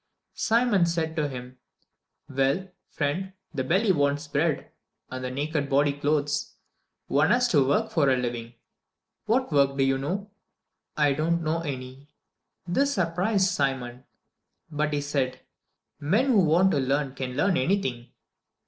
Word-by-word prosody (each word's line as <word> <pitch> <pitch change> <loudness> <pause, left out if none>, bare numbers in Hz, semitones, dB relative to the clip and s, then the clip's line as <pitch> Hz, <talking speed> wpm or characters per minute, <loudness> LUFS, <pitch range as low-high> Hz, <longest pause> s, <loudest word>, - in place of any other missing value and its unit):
Simon 225 -6 +2
said 165 -1 -1
to 155 -3 0
him, 125 -1 -9 0.7
"Well, 140 +8 0 0.2
friend; 180 +6 -2 0.2
the 135 -3 -1
belly 190 - +2
wants 145 -2 0
bread, 145 +1 -1 0.4
and 130 0 -5
the 125 - -2
naked 145 +2 -2
body 140 +1 +3
clothes. 145 +1 -1 0.5
One 150 +3 +2
has 245 +1 +3
to 145 - +4
work 140 - +1
for 145 -5 +3
a 130 - +3
living 120 -1 -4 0.7
What 245 -1 +1
work 140 -1 +3
do 135 - +3
you 135 0 +1
know?" 195 +9 -4 0.7
"I 145 -2 +3
do 155 +4 -1
not 170 0 +1
know 160 +1 0
any." 135 -2 -7 0.6
This 280 +10 +1
surprised 190 +2 +1
Simon, 130 -5 -2 0.7
but 150 0 -1
he 145 -1 0
said, 135 -3 -2 0.6
"Men 210 - +1
who 200 -7 +4
want 175 +5 +4
to 145 - +1
learn 135 +1 0
can 130 -2 -5
learn 185 +4 +2
anything." 130 -6 0
145 Hz, 150 wpm, -26 LUFS, 135-175 Hz, 0.7 s, to